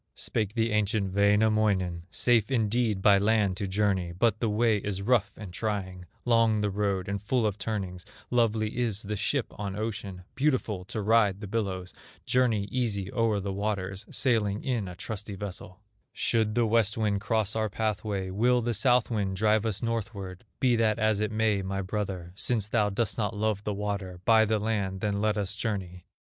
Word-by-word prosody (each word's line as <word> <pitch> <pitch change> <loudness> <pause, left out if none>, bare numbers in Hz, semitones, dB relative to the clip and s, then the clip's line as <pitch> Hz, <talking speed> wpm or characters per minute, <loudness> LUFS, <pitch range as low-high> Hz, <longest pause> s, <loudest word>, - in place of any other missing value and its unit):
Spake 105 -1 -1
the 115 -1 +1
ancient 105 -2 0
Wainamoinen: 100 -4 +2
"Safe 115 +1 +2
indeed 110 -4 +1
by 100 -2 +6
land 105 -2 +2
to 100 - -2
journey, 95 -3 0
But 110 +4 +1
the 115 - 0
way 110 +1 +2
is 100 -1 -3
rough 110 -2 +2
and 100 -5 -8
trying, 95 -3 -3 0.2
Long 115 -3 +3
the 105 -1 0
road 100 -2 -1
and 100 -1 -3
full 120 +2 +1
of 105 -1 -1
turnings; 95 -4 -4 0.3
Lovely 115 -3 +1
is 110 -4 -1
the 105 +1 -3
ship 115 +5 -1
on 100 -2 -3
ocean, 105 -4 -5
Beautiful 130 -9 0
to 110 - -4
ride 105 -3 +3
the 105 - -6
billows, 95 -4 -3 0.3
Journey 120 -5 +2
easy 105 -7 -2
o'er 115 -3 +1
the 100 0 -3
waters, 100 -1 -3
Sailing 110 -5 +1
in 120 -7 -1
a 90 - -7
trusty 105 +2 -5
vessel; 95 -1 -7 0.3
Should 110 -2 0
the 120 -1 +3
West 110 -1 +2
wind 105 -3 0
cross 110 0 0
our 110 -1 0
pathway, 100 -2 -2
Will 120 +5 +2
the 120 0 0
South 125 +2 +3
wind 100 -4 -1
drive 110 +2 +2
us 105 +1 -3
northward. 110 -4 -4
Be 125 -2 +3
that 110 -1 +2
as 110 -2 +2
it 105 0 -1
may, 110 -2 +1
my 95 +1 -3
brother, 95 -3 -4
Since 110 0 0
thou 105 -2 +2
dost 110 +3 -1
not 105 0 -1
love 105 -1 0
the 105 - 0
water, 100 -3 -4
By 110 -1 +6
the 110 0 +1
land 100 -3 -2
then 100 -1 -1
let 105 0 +1
us 100 -1 -1
journey. 95 -6 -4
105 Hz, 185 wpm, -28 LUFS, 100-110 Hz, 0.3 s, by